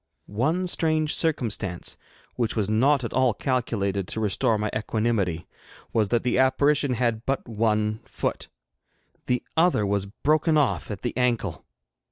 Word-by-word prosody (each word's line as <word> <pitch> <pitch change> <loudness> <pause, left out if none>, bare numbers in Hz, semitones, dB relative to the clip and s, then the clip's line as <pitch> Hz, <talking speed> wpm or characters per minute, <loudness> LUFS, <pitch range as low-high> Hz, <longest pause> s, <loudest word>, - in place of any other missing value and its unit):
One 155 - 0
strange 155 -3 +1
circumstance, 110 - -2 0.4
which 115 -3 -1
was 105 -4 0
not 130 +6 +3
at 115 - -4
all 130 -3 +3
calculated 100 -7 -1
to - - -4
restore 110 +2 +1
my 105 0 -2
equanimity, 105 -7 -1 0.5
was 110 -2 +2
that 120 -1 +1
the 125 0 +1
apparition 140 +1 +3
had 115 -2 0
but 135 +1 -2
one 110 -1 0
foot; - - -3 0.8
the 125 0 0
other 165 -10 +3
was 100 0 0
broken 155 +8 +1
off 145 -3 +1
at 105 -3 -6
the 120 - -2
ankle! 120 - -1
115 Hz, 145 wpm, -25 LUFS, 105-135 Hz, 0.8 s, not